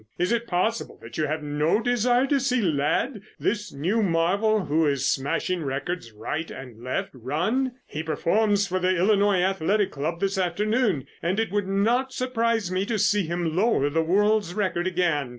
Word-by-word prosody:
Is 180 +4 0
it 235 0 0
possible 220 +5 -1
that - - -8
you 155 - +1
have 155 +1 -3
no 150 +6 +1
desire 245 +2 +2
to 275 0 +2
see 255 -1 +1
Ladd, 185 - 0 0.2
this 210 -1 -1
new 180 +11 0
marvel 195 +4 +2
who 155 +2 +2
is 140 -2 0
smashing 160 +5 -1
records 135 -1 -4
right 130 +10 -4
and 125 -3 -10
left, 125 - -2
run? 175 - -1
He 150 - -5
performs 200 +6 +1
for 185 -1 -1
the 185 0 +1
Illinois 200 0 +3
Athletic 195 +2 +1
Club 155 +4 -3
this 195 0 0
afternoon, 200 - 0 0.2
and 180 +5 0
it 225 - -1
would 205 -1 -1
not 235 +7 +1
surprise 230 -6 0
me 185 +1 0
to 230 - 0
see 205 -2 +2
him 170 -1 -2
lower 180 -8 +2
the 165 +2 +2
world's 200 +2 +2
record 185 -4 0
again. 170 -7 0
185 Hz, 175 wpm, -25 LUFS, 160-215 Hz, 0.2 s, Illinois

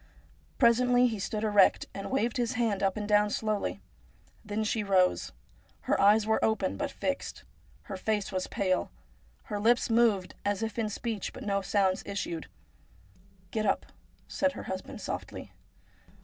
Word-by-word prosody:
Presently 245 0 +4
he 225 -4 0
stood 210 +2 -3
erect, 205 -3 +4
and 195 - -6
waved 240 -3 0
his 240 -2 0
hand 225 -4 0
up 195 0 +1
and 210 -1 -3
down 210 0 +4
slowly. 215 -1 -2 0.6
Then 210 0 -2
she 215 +1 0
rose. 190 -2 +2 0.5
Her - - +1
eyes 210 +2 +5
were 220 0 +1
open, 210 -4 +1
but 290 -1 -2
fixed. 280 0 -4 0.4
Her 195 - -6
face 210 +1 -1
was 185 -1 -2
pale. 185 -2 0 0.5
Her 205 - -4
lips 235 +3 +3
moved 225 -5 +3
as 205 +1 -1
if 225 +1 -3
in 220 -2 0
speech, 220 -1 -4
but - - -8
no 200 -1 0
sounds 190 -1 +1
issued. 170 -5 -4 0.5
' 180 - -30
Get 215 0 -1
up! - - +1 0.3
' - - -34
said 280 -1 0
her - - -7
husband 190 0 -6
softly. - - -6
210 Hz, 165 wpm, -29 LUFS, 195-225 Hz, 0.6 s, eyes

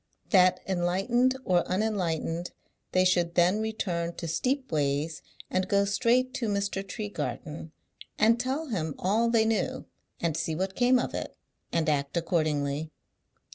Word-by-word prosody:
That, 185 -3 +5
enlightened 195 +8 +1
or 180 -2 +3
unenlightened, 180 -4 -1 0.4
they 185 0 +3
should 175 -2 +2
then 180 +4 +4
return 175 -6 -2
to 170 - -6
Steepways 160 - -1 0.3
and 185 0 0
go 200 0 +3
straight 240 +5 +2
to 235 - -2
Mr. 200 -1 -1
Tregarthen, 160 - -5 0.5
and 230 +2 +4
tell 270 +5 -2
him 160 - -2
all 220 +5 +2
they 230 -1 +3
knew, 255 +4 -1 0.3
and 165 -3 0
see 160 -1 -2
what 190 +3 -2
came 250 +1 +4
of 245 - -2
it, - - -5 0.3
and 165 -1 0
act 140 +1 0
accordingly. 155 -3 0
185 Hz, 135 wpm, -28 LUFS, 165-220 Hz, 0.5 s, That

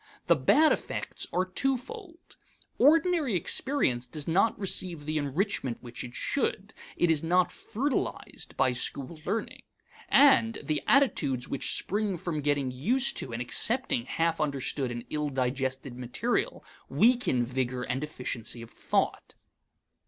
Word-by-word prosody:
The - - +5
bad 310 0 +4
effects - - -3
are 180 +1 +1
twofold. 305 - -4 0.4
Ordinary 315 - +4
experience 155 - +1
does 150 +3 -6
not 190 +7 +2
receive 180 -5 0
the 155 0 -1
enrichment 145 - -1
which 120 0 -7
it 120 -1 -9
should; - - -2 0.2
it 175 - +3
is 155 -2 +1
not 180 +2 +2
fertilized 270 +6 -3
by 130 - +3
school 140 +5 -2
learning. 225 - -3 0.5
And 265 -5 +5
the 155 -2 -1
attitudes 145 - +2
which 140 - 0
spring 205 -1 -1
from 165 -3 -3
getting 145 -2 0
used 240 - +1
to 130 - -3
and 120 +2 -3
accepting 245 - +1
half 165 0 0
understood 140 -2 -1
and 120 -1 -6
ill 150 -1 -1
digested 130 0 -2
material 125 - -2 0.2
weaken 235 - +3
vigor 125 0 -2
and 130 +3 -2
efficiency 125 -5 -4
of 115 - -13
thought. - - -1
155 Hz, 135 wpm, -28 LUFS, -, 0.5 s, The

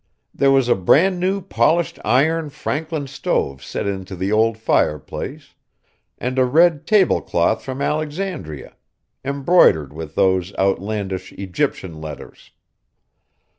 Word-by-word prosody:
There 140 - +2
was 135 -2 +3
a 120 - +5
bran 175 - +3
new 190 +2 0
polished 170 -2 +1
iron 155 +5 +2
Franklin 150 +1 -3
stove 70 - -2
set - - -4
into 95 -1 -4
the 95 +3 -2
old 110 +1 +2
fireplace, 75 -9 -2 0.6
and 130 +2 -2
a - - +5
red 155 +4 +3
table 210 -4 +4
cloth 85 +6 0
from 135 +1 -4
Alexandria, 150 - -4 0.5
embroidered 140 - +3
with 80 -1 -8
those 95 0 +1
outlandish 95 -1 -2
Egyptian 90 -3 -3
letters. 75 -2 -10
125 Hz, 120 wpm, -20 LUFS, 95-155 Hz, 0.6 s, a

